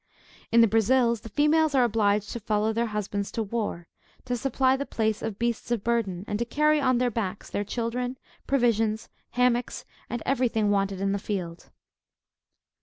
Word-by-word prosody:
In 230 Hz, +1 st, +6 dB
the 230 Hz, -, +6 dB
Brazils, 230 Hz, +2 st, +2 dB
the 225 Hz, -, -9 dB
females 300 Hz, +4 st, +3 dB
are 260 Hz, -, +5 dB
obliged 210 Hz, -3 st, +1 dB
to 235 Hz, -, -4 dB
follow 215 Hz, 0 st, 0 dB
their 230 Hz, +1 st, 0 dB
husbands 205 Hz, -1 st, -3 dB
to 225 Hz, -, -1 dB
war, 210 Hz, -5 st, -3 dB, 0.4 s
to 250 Hz, -1 st, -1 dB
supply 260 Hz, +1 st, +2 dB
the 275 Hz, -, -2 dB
place 220 Hz, -1 st, -1 dB
of 210 Hz, -3 st, -4 dB
beasts 235 Hz, 0 st, -2 dB
of 235 Hz, -4 st, -1 dB
burden, 205 Hz, -6 st, -1 dB
and 205 Hz, -, -2 dB
to -, -, +1 dB
carry 300 Hz, +4 st, +2 dB
on 255 Hz, -2 st, +3 dB
their 245 Hz, 0 st, +1 dB
backs 205 Hz, -3 st, -4 dB
their 205 Hz, -, -1 dB
children, 245 Hz, +4 st, -3 dB, 0.3 s
provisions, 225 Hz, -4 st, +1 dB, 0.2 s
hammocks, 245 Hz, 0 st, +1 dB, 0.2 s
and 240 Hz, -, -4 dB
every 260 Hz, -2 st, +2 dB
thing 215 Hz, -3 st, +1 dB
wanted 195 Hz, -1 st, 0 dB
in 195 Hz, 0 st, +1 dB
the 200 Hz, -, -1 dB
field. 180 Hz, -5 st, -5 dB
230 Hz, 180 wpm, -26 LUFS, 205-245 Hz, 0.4 s, In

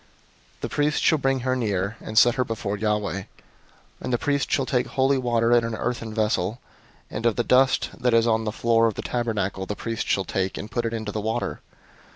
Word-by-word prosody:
005:016 -, -, -32 dB
The -, -, -3 dB
priest 150 Hz, +1 st, 0 dB
shall 160 Hz, -, +4 dB
bring 135 Hz, -1 st, +1 dB
her 130 Hz, +1 st, 0 dB
near, 105 Hz, -4 st, -1 dB
and 110 Hz, -, -6 dB
set 120 Hz, +2 st, +7 dB
her 130 Hz, 0 st, +1 dB
before 110 Hz, -4 st, -3 dB
Yahweh; 105 Hz, -2 st, -1 dB
005:017 -, -, -12 dB, 0.8 s
and -, -, -3 dB
the 120 Hz, -, +2 dB
priest 140 Hz, +2 st, -1 dB
shall 135 Hz, -, +2 dB
take 125 Hz, -1 st, 0 dB
holy 135 Hz, +1 st, +2 dB
water 120 Hz, -2 st, +1 dB
in 120 Hz, -1 st, +5 dB
an 115 Hz, -1 st, -2 dB
earthen 115 Hz, -1 st, -3 dB
vessel; 110 Hz, 0 st, 0 dB, 0.5 s
and 105 Hz, -, -4 dB
of 115 Hz, -, +1 dB
the 120 Hz, -, +1 dB
dust 130 Hz, +2 st, +3 dB
that 125 Hz, -, +2 dB
is 115 Hz, 0 st, +4 dB
on 110 Hz, -1 st, +2 dB
the 110 Hz, -, -2 dB
floor 115 Hz, +1 st, +3 dB
of 110 Hz, -, -2 dB
the -, -, -5 dB
tabernacle 105 Hz, -6 st, -2 dB
the 105 Hz, -, -3 dB
priest 115 Hz, +1 st, -4 dB
shall 95 Hz, -, +1 dB
take, 95 Hz, 0 st, -2 dB
and 110 Hz, -, -7 dB
put 120 Hz, -1 st, -1 dB
it 115 Hz, -, -4 dB
into 110 Hz, -2 st, -4 dB
the 105 Hz, -, -3 dB
water. 110 Hz, +2 st, -2 dB
115 Hz, 225 wpm, -24 LUFS, 105-125 Hz, 0.8 s, set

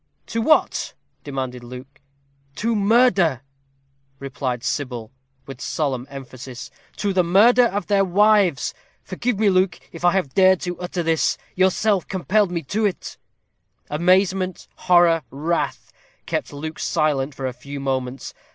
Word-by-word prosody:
"To 230 Hz, -, -3 dB
what?" 310 Hz, +7 st, +2 dB, 0.3 s
demanded 130 Hz, -3 st, -5 dB
Luke. 125 Hz, +3 st, -11 dB, 0.5 s
"To 230 Hz, +5 st, -1 dB
murder!" 200 Hz, -, +3 dB, 0.7 s
replied 130 Hz, -3 st, -4 dB
Sybil, 125 Hz, -5 st, -3 dB, 0.3 s
with 135 Hz, -2 st, -10 dB
solemn 135 Hz, -2 st, -2 dB
emphasis. 130 Hz, -2 st, -9 dB, 0.2 s
"To 200 Hz, -2 st, -1 dB
the 185 Hz, -1 st, +3 dB
murder 225 Hz, +8 st, +5 dB
of 205 Hz, -1 st, -3 dB
their 200 Hz, -1 st, +2 dB
wives. 195 Hz, -5 st, +3 dB, 0.3 s
Forgive 225 Hz, +4 st, -2 dB
me, 205 Hz, -1 st, +3 dB
Luke, 185 Hz, 0 st, +1 dB
if 165 Hz, -, -10 dB
I 175 Hz, -, +4 dB
have 180 Hz, -9 st, -1 dB
dared 190 Hz, -1 st, +5 dB
to 180 Hz, -1 st, -4 dB
utter 180 Hz, 0 st, -3 dB
this. 160 Hz, -1 st, +1 dB, 0.2 s
Yourself 190 Hz, +1 st, +1 dB
compelled 195 Hz, +2 st, +1 dB
me 170 Hz, -2 st, -3 dB
to 210 Hz, +10 st, -2 dB
it." 200 Hz, -4 st, -2 dB, 0.7 s
Amazement, 185 Hz, +3 st, +1 dB
horror, 175 Hz, -2 st, +4 dB
wrath, 155 Hz, +6 st, -3 dB, 0.3 s
kept -, -, -3 dB
Luke 155 Hz, +2 st, -7 dB
silent 150 Hz, -4 st, 0 dB
for 135 Hz, -, -5 dB
a 130 Hz, -, -2 dB
few 140 Hz, +3 st, -8 dB
moments. 130 Hz, -1 st, -3 dB
170 Hz, 135 wpm, -22 LUFS, 135-195 Hz, 0.7 s, murder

